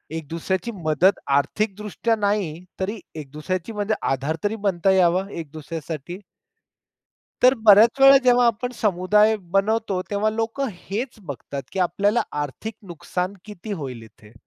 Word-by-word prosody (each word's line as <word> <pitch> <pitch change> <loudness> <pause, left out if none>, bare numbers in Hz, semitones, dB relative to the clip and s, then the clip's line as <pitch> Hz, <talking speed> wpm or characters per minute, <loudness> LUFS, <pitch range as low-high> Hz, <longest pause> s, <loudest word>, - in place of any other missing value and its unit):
एक 160 -3 -6
दुसऱ्याची 185 +6 -2
मदत 160 +6 +3 0.2
आर्थिकदृष्ट्या 210 +7 -1
नाही 200 -6 -1 0.2
तरी 205 +3 -3 0.2
एक 150 -3 -7
दुसऱ्याची 180 +7 -4
म्हणजे 210 +1 -1 0.2
आधार 135 +4 -1
तरी 205 +1 0
बनता 190 0 +2
यावा 185 0 +3
एक 160 -4 -7
दुसऱ्यासाठी. 160 +3 -7 1.2
तर 255 +1 +7
बऱ्याच 220 +6 +7
वेळा 270 0 +9
जेव्हा 245 -1 +5
आपण 235 +2 0
समुदाय 210 +2 +3 0.2
बनवतो, 200 -1 +1
तेव्हा 205 +1 +1
लोकं 225 +5 -2 0.2
हेच 235 +6 -3
बघतात 140 0 -6
की 195 - -5
आपल्याला 200 +6 +2 0.2
आर्थिक 205 +10 -6
नुकसान 180 +2 -4
किती 210 0 -8
होईल 130 - -6
इथे. 110 -1 -17
195 Hz, 135 wpm, -23 LUFS, 165-215 Hz, 1.2 s, वेळा